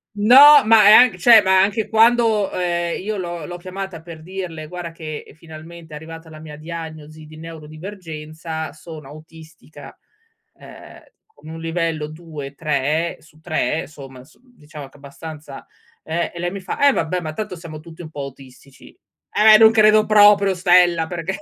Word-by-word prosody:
No, 275 +7 +7
ma 220 0 +5
è 210 - +8
anc 245 -3 +6
cioè, 225 +2 +6
ma 190 0 +2
anche 205 +3 +1
è - - -22
quando, 225 -2 +2
ehm, 175 -1 -3
io 210 +1 -4
l'ho 175 -4 -6
l'ho 175 0 -8
chiamata 185 -1 -8
per 165 -2 -12
dirle: 170 -3 -8
“Guarda 175 0 -8
che 155 -4 -9
finalmente 160 0 -13
è - - -7
arrivata 165 +1 -11
la 155 - -13
mia 155 -1 -11
diagnosi 155 -1 -10
di 155 +1 -15
neurodivergenza, 160 -1 -9
sono 155 -3 -12
autistica, 155 +1 -15 0.6
ehm, - - -14 0.3
con 435 - -17
un 165 0 -9
livello 165 -2 -3
2-3 155 0 -4
su 155 -1 -23
3, 160 -1 -3
somma 135 -4 -13
s 155 - -24
diciamo 155 - -14
che - - -24
è - - -18
abbastanza” 145 0 -11 0.4
eh, 170 +2 -3
e 170 - -11
lei 175 0 -3
mi 200 - -7
fa: 285 +9 -1
“Eh - - +6
vabbè, 175 +3 -2
ma 155 -1 -6
tanto 200 0 -6
siamo 165 -3 -10
tutti 165 +2 -13
un 155 - -11
po' 145 - -7
autistici.” 135 0 -14 0.4
"Eh, 215 +1 +6
non 220 0 +6
credo 215 -1 +4
proprio, 205 -2 +4
stella, 175 -2 +2
perché 180 +2 -5
165 Hz, 170 wpm, -19 LUFS, 155-190 Hz, 0.6 s, è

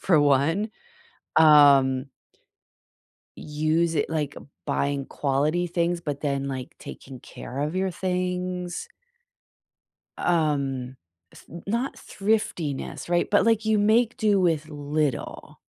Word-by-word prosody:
for 165 -6 +4
one, 145 +10 +2 0.7
um 140 -4 +6 1.3
use 155 +2 0
it, 145 - 0
like, 150 -3 -2 0.3
buying 140 -1 -1
quality 150 +5 0
things, 170 0 0
but 145 -4 -5
then, 140 -2 -1
like, 130 -2 -5
taking 130 -2 -10
care 130 +3 -8
of 150 +4 -2
your 190 0 0
things. 180 -1 -3 1.3
Um, 140 -6 0 0.4
th - - -15 0.2
not 235 +6 -1
thriftiness, 195 -10 -2
right? 175 0 +1
But, 205 - +3
like, 225 -1 +2
you 220 -1 +3
make 220 +3 +3
do 210 -3 +3
with 160 -4 +1
little. 145 -1 -3
155 Hz, 110 wpm, -25 LUFS, 140-180 Hz, 1.3 s, um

